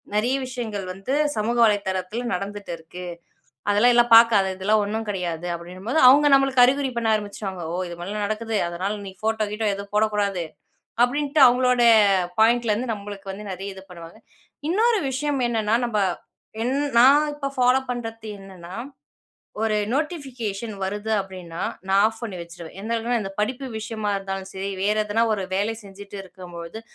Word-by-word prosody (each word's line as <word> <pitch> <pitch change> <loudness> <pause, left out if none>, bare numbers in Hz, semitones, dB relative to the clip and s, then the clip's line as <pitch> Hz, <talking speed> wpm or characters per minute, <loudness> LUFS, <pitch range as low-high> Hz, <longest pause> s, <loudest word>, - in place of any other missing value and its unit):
நிறைய 240 +5 +2
விஷயங்கள் 225 -6 -5
வந்து 195 +8 -4 0.2
சமூக 225 +3 -1
வலைதளத்தில் 200 +1 0
நடந்துட்டு 200 +1 -5
இருக்கு. 170 +3 -10 0.7
அதெல்லாம் 215 +4 +5
எல்லாம் 240 0 +4
பார்க்காத! 225 -4 +5
இதெல்லாம் 210 +3 +2
ஒண்ணும் 220 +2 -3
கிடையாது, 175 -3 -3
அப்பிடினும்போது 185 - -3
அவுங்க 290 +3 +7
நம்மளுக்கு 270 -2 +4
அறிகுறி 270 +1 +1
பண்ண 230 -1 +1
ஆரம்பிச்சுருவாங்க. 200 -3 -5
ஓ! - - -2
இது 170 - -6
மாதிரிலாம் 205 +4 -3
நடக்குது. 220 +1 -3
அதனால 185 +4 -3
நீ 190 - -8
ஃபோட்டோ 220 0 0
கீட்டோ 215 0 -1
எதுவும் 200 +1 -9
போடக்கூடாது. 205 -4 +1 0.6
அப்பிடின்ட்டு 285 +4 +1
அவுங்களோடய 250 -1 +4 0.5
பாயிண்ட்லருந்து 230 0 +2
நம்மளுக்கு 200 -1 -8
வந்து 210 +2 -8
நிறைய 195 +2 -6
இது 190 - -11
பண்ணுவாங்க. 170 -1 -11 0.5
இன்னொரு 440 +5 +3
விஷயம் 280 +1 -1
என்னன்னா, 220 -1 0
நம்ம 215 -3 -1 0.6
என் 250 +3 0 0.3
நான் 285 +4 +6
இப்போ 280 -2 -3
ஃபாலோப் 255 +1 +3
பண்றது 225 -2 -6
என்னன்னா, 185 -2 -11 0.9
ஒரு 220 -1 +1 0.2
நோட்டிபிகேஷன் 255 - -3
வருது 205 +3 -3
அப்பிடின்னா, 185 -3 -7 0.3
நான் 195 +1 +4
ஆஃப் 225 0 -4
பண்ணி 205 -5 -5
வச்சிருவேன். 170 0 -10
எந்த 220 +3 -4
அளவுக்னா, 235 +1 0
இந்த 195 - -5
படிப்பு 255 +5 -2
விஷயமா 215 -1 -3
இருந்தாலும் 195 -1 -5
சரி, 190 +1 -4
வேற 210 +2 +2
ஏதுன்னா 210 +2 +1
ஒரு 205 -2 -1
வேலை 205 +4 0
செஞ்சிட்டு 200 0 -11
இருக்கும் 185 -1 -12
பொழுது 170 +6 -7
210 Hz, 155 wpm, -23 LUFS, 195-240 Hz, 0.9 s, அவுங்க